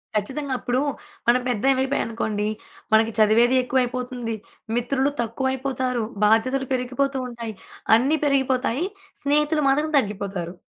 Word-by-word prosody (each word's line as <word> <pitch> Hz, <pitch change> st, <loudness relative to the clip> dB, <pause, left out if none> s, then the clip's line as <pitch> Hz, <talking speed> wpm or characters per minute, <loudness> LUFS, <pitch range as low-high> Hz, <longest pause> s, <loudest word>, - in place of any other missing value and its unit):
ఖచ్చితంగా. 265 Hz, +7 st, -2 dB
అప్పుడు 250 Hz, 0 st, 0 dB, 0.5 s
మనం 245 Hz, +1 st, +5 dB
పెద్దవి 260 Hz, +3 st, +2 dB
అయిపోయాం 265 Hz, +1 st, 0 dB
అనుకోండి 215 Hz, -2 st, -2 dB, 0.5 s
మనకి 220 Hz, +1 st, +5 dB
చదివేది 230 Hz, +4 st, +5 dB
ఎక్కువయిపోతుంది, 250 Hz, -2 st, -1 dB, 0.4 s
మిత్రులు 265 Hz, +3 st, +1 dB
తక్కువయిపోతారు, 260 Hz, 0 st, -1 dB, 0.2 s
బాధ్యతలు 255 Hz, +5 st, +2 dB
పెరిగిపోతూ 260 Hz, +2 st, -1 dB
ఉంటాయి. 235 Hz, -3 st, -6 dB, 0.4 s
అన్ని 270 Hz, +7 st, +2 dB
పెరిగిపోతాయి. 265 Hz, +1 st, +1 dB, 0.4 s
స్నేహితులు 300 Hz, +2 st, +2 dB
మాత్రం 300 Hz, +3 st, +1 dB
తగ్గిపోతారు. 195 Hz, -6 st, -2 dB
250 Hz, 105 wpm, -23 LUFS, 230-270 Hz, 0.5 s, మనం